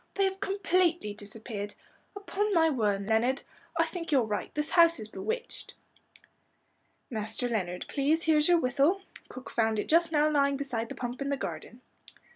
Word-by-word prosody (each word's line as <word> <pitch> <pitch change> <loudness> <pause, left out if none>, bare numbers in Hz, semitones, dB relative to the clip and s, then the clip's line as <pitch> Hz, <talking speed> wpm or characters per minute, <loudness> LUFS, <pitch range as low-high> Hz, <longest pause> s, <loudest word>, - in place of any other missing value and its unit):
"They 395 - +2
have 385 0 0
completely 365 - +1
disappeared. 205 0 -7 0.4
Upon 405 0 -1
my 325 -1 +4
word, 205 -6 0
Leonard, 235 +4 +2 0.3
I 330 - +4
think 335 0 -6
you're 270 -4 +4
right, 210 -2 -3
this 300 0 -1
house 335 -4 +5
is 215 - -6
bewitched." 455 - -5 1.4
"Master 220 +2 -2
Leonard, 180 -6 -2
please, 305 +4 +1
here's 305 -2 +4
your 350 -1 +5
whistle. 300 +7 +2 0.3
Cook 255 - -9
found 220 -1 +1
it 210 - -2
just 335 +1 +3
now 300 -1 +3
lying 280 -2 +2
beside 235 -5 -3
the - - -6
pump 245 +2 -5
in 275 - -1
the 280 - 0
garden." 250 -2 -6
280 Hz, 165 wpm, -29 LUFS, 225-335 Hz, 1.4 s, house